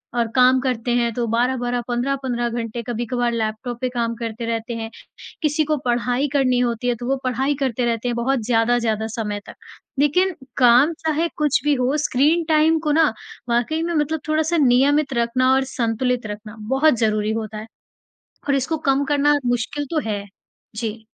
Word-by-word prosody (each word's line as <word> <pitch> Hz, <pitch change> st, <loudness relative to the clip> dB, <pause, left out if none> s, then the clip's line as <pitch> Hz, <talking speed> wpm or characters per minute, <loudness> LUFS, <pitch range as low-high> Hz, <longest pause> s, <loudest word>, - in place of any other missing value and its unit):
और 235 Hz, -1 st, +1 dB
काम 255 Hz, +1 st, +5 dB
करते 250 Hz, -2 st, -1 dB
हैं 235 Hz, -1 st, +1 dB
तो 240 Hz, +1 st, -1 dB
12-12 245 Hz, +1 st, 0 dB
15 245 Hz, -1 st, -1 dB
घंटे 235 Hz, 0 st, -4 dB
कभी-कभार 240 Hz, +1 st, -1 dB
लैपटॉप 230 Hz, +2 st, -3 dB
पे 255 Hz, -, 0 dB
काम 235 Hz, -2 st, -2 dB
करते 230 Hz, 0 st, -5 dB
रहते 230 Hz, +1 st, -3 dB
हैं। 225 Hz, -1 st, -5 dB, 0.5 s
किसी 310 Hz, 0 st, +1 dB
को 305 Hz, 0 st, 0 dB
पढ़ाई 245 Hz, +3 st, +1 dB
करनी 255 Hz, -3 st, +2 dB
होती 240 Hz, 0 st, -1 dB
है 245 Hz, -, +2 dB
तो 240 Hz, -, -5 dB
वो 270 Hz, -, +2 dB
पढ़ाई 265 Hz, +3 st, 0 dB
करते 255 Hz, -3 st, 0 dB
रहते 230 Hz, 0 st, -1 dB
हैं 240 Hz, -, -1 dB
बहुत 255 Hz, +3 st, 0 dB
ज़्यादा, 235 Hz, +1 st, +2 dB
ज़्यादा 220 Hz, -2 st, -1 dB
समय 210 Hz, -2 st, -4 dB
तक। -, -, -10 dB, 0.4 s
लेकिन 360 Hz, +7 st, +3 dB, 0.2 s
काम 250 Hz, +5 st, +5 dB
चाहे 320 Hz, +1 st, 0 dB
कुछ 300 Hz, -2 st, +2 dB
भी 295 Hz, 0 st, +3 dB
हो 255 Hz, +2 st, 0 dB
स्क्रीन 300 Hz, +3 st, +2 dB
टाइम 315 Hz, +1 st, +4 dB
को 305 Hz, -1 st, -1 dB
ना 310 Hz, -4 st, +3 dB, 0.4 s
वाक़ई 245 Hz, +7 st, 0 dB
में 340 Hz, 0 st, -2 dB
मतलब 310 Hz, 0 st, 0 dB
थोड़ा-सा 315 Hz, +2 st, +1 dB
नियमित 275 Hz, +1 st, +3 dB
रखना 245 Hz, +2 st, +2 dB
और 265 Hz, 0 st, +3 dB
संतुलित 245 Hz, -1 st, -1 dB
रखना 210 Hz, +1 st, -8 dB
बहुत 270 Hz, +1 st, +4 dB
ज़रूरी 215 Hz, -1 st, +1 dB
होता 220 Hz, -1 st, -4 dB
है 215 Hz, +1 st, -7 dB, 0.8 s
और 280 Hz, -, +3 dB
इसको 275 Hz, +4 st, 0 dB
कम 275 Hz, +1 st, +2 dB
करना 290 Hz, 0 st, +3 dB
मुश्किल 245 Hz, +4 st, -1 dB
तो 320 Hz, -, +1 dB
है। 205 Hz, -1 st, -2 dB, 0.5 s
जी। 220 Hz, -1 st, -4 dB
245 Hz, 180 wpm, -21 LUFS, 230-285 Hz, 0.8 s, काम